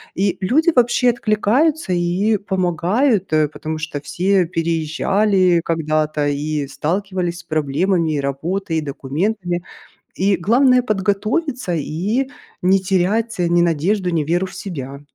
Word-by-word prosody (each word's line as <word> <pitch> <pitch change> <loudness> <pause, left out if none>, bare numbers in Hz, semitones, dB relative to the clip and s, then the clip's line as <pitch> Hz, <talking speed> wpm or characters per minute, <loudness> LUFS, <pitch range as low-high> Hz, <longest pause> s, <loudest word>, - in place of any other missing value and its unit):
И 190 -1 0
люди 310 - +3
вообще 245 0 +3
откликаются 235 - +1
и 180 +5 +1
помогают, 190 - 0
э, 155 -1 +3
потому 155 +1 -5
что 155 -2 -5
все 185 +4 +1
переезжали 170 +3 +1
когда-то 155 -2 0
и 145 0 -2
сталкивались 175 +4 -2
с - - -12
проблемами 155 +2 0
и 145 - -1
работой, 160 +5 -2
и - - -3
документами. 175 +6 -2 0.5
И 195 +1 +2
главное- 250 +7 +4
подготовиться 215 - -1
и 200 - -1 0.3
не 190 +2 +4
терять, 195 +4 0
э, 175 - +2
ни 175 0 +3
надежду, 180 +4 +1
ни 165 -3 0
веру 175 +4 0
в - - -11
себя. 140 -7 -6
180 Hz, 130 wpm, -19 LUFS, 160-205 Hz, 0.5 s, главное